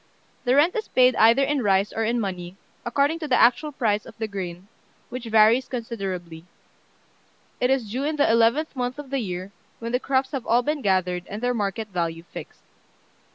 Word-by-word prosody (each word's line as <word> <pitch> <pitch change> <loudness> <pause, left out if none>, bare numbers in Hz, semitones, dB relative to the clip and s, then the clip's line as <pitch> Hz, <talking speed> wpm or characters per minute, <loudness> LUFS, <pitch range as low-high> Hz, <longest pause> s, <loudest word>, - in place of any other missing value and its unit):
The 250 +1 +3
rent 305 +5 +4
is 440 -1 -2
paid 255 -1 +4
either 230 +5 +5
in 285 0 0
rice 195 -2 +2
or 225 - -1
in 235 +2 0
money, 185 -3 -5 0.3
according 280 +6 +1
to 310 - -4
the 250 -3 +3
actual 245 +6 +4
price 215 -7 0
of - - -14
the 220 - -3
grain, 185 -2 -6 0.4
which 250 0 -6
varies 225 +3 +4
considerably. 190 -9 -5 1.2
It 250 - +2
is 255 -6 0
due 260 +5 -2
in 310 +1 -1
the 290 - +3
eleventh 230 +8 +2
month 250 0 -3
of 290 -2 -9
the 275 - 0
year, 185 -3 -5 0.3
when 230 0 -5
the 250 - +1
crops 265 0 0
have 270 -4 -4
all 240 +2 +3
been 300 +2 -1
gathered, 180 -4 0
and 210 - -6
their 245 +1 0
market 210 0 -3
value 170 -3 -3
fixed. - - -11
230 Hz, 195 wpm, -24 LUFS, 195-265 Hz, 1.2 s, either